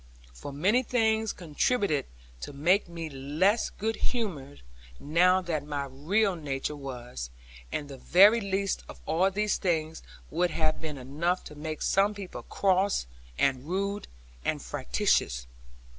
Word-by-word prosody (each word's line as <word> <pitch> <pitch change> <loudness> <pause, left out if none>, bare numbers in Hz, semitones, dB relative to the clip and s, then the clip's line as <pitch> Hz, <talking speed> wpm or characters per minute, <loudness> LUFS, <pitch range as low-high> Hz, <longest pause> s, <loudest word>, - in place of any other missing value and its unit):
For 60 - -8
many 190 - +3
things 220 -3 +1
contributed 175 - 0 0.3
to 145 - -7
make 175 +7 +2
me 165 -1 -5
less 155 - +1
good 220 +2 -3
humoured 160 - -3 0.4
now 180 +5 +4
than 155 -4 -2
my 140 -1 -1
real 190 +9 +1
nature 145 -2 -3
was; 125 - -6 0.4
and 145 - -3
the 135 -2 -9
very 205 - +6
least 195 0 -1
of - - -10
all 175 +5 +3
these 210 +2 0
things 160 -3 -1 0.3
would 175 +3 +2
have 155 -1 0
been 155 -3 -4
enough 155 +8 -1
to 150 - -10
make 155 +1 -4
some 200 +2 +3
people 195 -2 -7
cross, 195 - +1 0.3
and 135 -1 +2
rude, 200 +3 -2 0.4
and - - 0
fractious. - - 0
170 Hz, 140 wpm, -29 LUFS, 145-200 Hz, 0.4 s, very